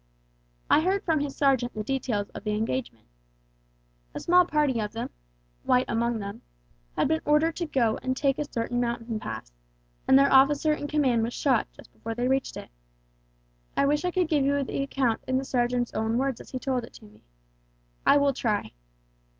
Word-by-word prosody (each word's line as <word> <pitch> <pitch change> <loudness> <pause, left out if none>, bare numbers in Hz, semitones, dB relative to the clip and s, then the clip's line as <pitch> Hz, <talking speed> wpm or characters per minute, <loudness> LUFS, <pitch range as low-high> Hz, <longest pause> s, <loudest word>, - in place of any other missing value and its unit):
I 305 - +5
heard 385 +4 0
from 320 -3 +1
his 285 -1 -4
sergeant 265 -4 +2
the 215 - -3
details 235 -5 -2
of - - -9
the 210 -1 -1
engagement. 220 - -3 1.1
A - - -3
small 360 +1 +4
party 295 -7 +1
of 210 -1 -3
them 230 - -5 0.5
White 250 +1 +2
among 235 +1 0
them 200 -1 -7 0.5
had - - +2
been 315 +2 0
ordered 300 +2 +2
to 345 - -2
go 235 -6 +1
and 260 0 -2
take 275 -1 +1
a 295 - -4
certain 245 +1 -1
mountain 235 -2 -2
pass, - - -7 0.6
and 265 - +7
their 275 0 +4
officer 290 +3 +5
in 290 -1 -4
command 270 -6 +2
was 230 +2 -2
shot 260 -6 +1
just - - -17
before 225 0 -6
they 245 +1 0
reached 265 +1 0
it. - - -9 1.1
I - - +4
wish 295 +3 +1
I 360 - +1
could 360 -1 0
give 300 -3 +2
you 280 +1 +1
the 275 - -3
account 270 -4 0
in 260 - +1
the 270 - -2
sergeant's 245 -1 0
own 220 +1 0
words 265 -1 -1
as - - -14
he 260 - -4
told 255 -2 -1
it 230 - -12
me. 210 -1 -18 0.8
I - - +5
will 280 -1 +3
try. 215 - -2
260 Hz, 190 wpm, -27 LUFS, 230-290 Hz, 1.1 s, and